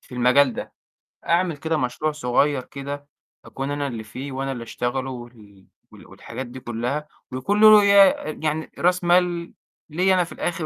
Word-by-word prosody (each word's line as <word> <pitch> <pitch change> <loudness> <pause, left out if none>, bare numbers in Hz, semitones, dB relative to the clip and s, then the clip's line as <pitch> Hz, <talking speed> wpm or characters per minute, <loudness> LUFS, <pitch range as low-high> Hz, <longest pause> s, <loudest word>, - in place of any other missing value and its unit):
في 125 - -14
المجال 125 +2 +4
ده، - - -7 0.5
أعمل 170 -2 +1
كده 160 +2 -1
مشروع 130 +4 -1
صغير 140 -1 +1
كده 140 +1 -7 0.4
أكون 135 +1 -5
أنا 145 0 -2
اللي 115 -4 -6
فيه 135 +6 -8
وأنا 135 +1 -3
اللي 120 -3 -5
أشتغله 130 +3 -3
وال 115 -6 -12 0.2
وال - - -15
والحاجات 130 - -8
دي 125 +2 -10
كُلّها 125 +5 -3 0.2
ويكون 200 +12 -1
له 215 -1 +9
ي 200 0 +4
آآ 155 -5 0
يعني 155 0 -2
رأس 180 +1 +2
مال 175 -1 +1 0.4
ليّا 185 +5 +2
أنا 180 - +3
في 170 - -11
الآخِر 170 -2 -3
140 Hz, 175 wpm, -23 LUFS, 125-170 Hz, 0.5 s, له